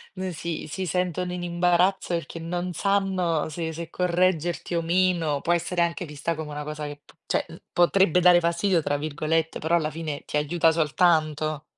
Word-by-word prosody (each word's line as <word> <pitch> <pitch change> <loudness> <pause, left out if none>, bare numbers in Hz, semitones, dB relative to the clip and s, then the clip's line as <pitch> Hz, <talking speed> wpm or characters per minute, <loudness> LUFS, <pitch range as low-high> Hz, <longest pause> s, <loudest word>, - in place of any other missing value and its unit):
non 185 -1 -4
si 165 0 -5
si 185 +5 -4
sentono 180 0 -1
in 180 0 -4
imbarazzo 175 +1 +2
perché 165 0 -4
non 175 +2 -3
sanno 190 -4 0
se 160 +1 -4
se 165 +1 -7
correggerti 175 -1 0
o 170 - +1
meno 170 -4 +1
può 170 +4 +1
essere 175 +1 0
anche 170 +1 0
vista 150 +1 -3
come 155 -1 -6
una 150 0 -5
cosa 150 0 -5
che 145 0 -8
p - - -18
cioè, - - 0
uhm, - - -12
potrebbe 180 0 +4
dare 180 -1 +6
"fastidio", 170 +1 +1
tra 145 - 0
virgolette, 155 +2 -1
però 160 +2 +1
alla 155 -2 -1
fine 155 -2 -5
ti - - -6
aiuta 160 +2 +2
soltanto. 155 -1 +1
170 Hz, 185 wpm, -25 LUFS, 155-180 Hz, -, dare